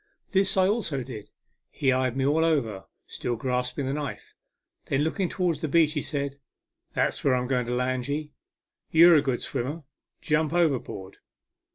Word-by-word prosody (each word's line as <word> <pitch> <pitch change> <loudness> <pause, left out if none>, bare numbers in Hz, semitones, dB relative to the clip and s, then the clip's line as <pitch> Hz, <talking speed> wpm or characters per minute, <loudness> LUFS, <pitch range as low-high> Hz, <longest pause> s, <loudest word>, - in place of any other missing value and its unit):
This 195 0 +2
I 185 0 +5
also 190 - -1
did. 115 -5 -9 0.4
He 135 -2 +1
eyed 130 -1 0
me 135 - +1
all 155 +3 +3
over, 120 -12 0 0.2
still 120 - -3
grasping 125 +3 -2
the 135 - -1
knife. 145 -2 -5 0.5
Then 135 +2 +1
looking 175 +3 -1
towards 175 -5 -1
the 160 - -1
beach, 155 0 +3
he 150 - -1
said, 140 -2 -3 0.3
" - - -50
That's - - 0
where 135 -2 +4
I'm 125 0 0
going 125 -2 0
to 125 - -1
land 125 0 -1
ye. 150 +1 -3 0.6
You're 170 +2 +7
a 150 - +5
good 130 -4 -1
swimmer. 145 +7 -3 0.4
Jump 155 0 0
over 165 -7 +3
board." 95 -3 -9
140 Hz, 180 wpm, -26 LUFS, 125-160 Hz, 0.6 s, You're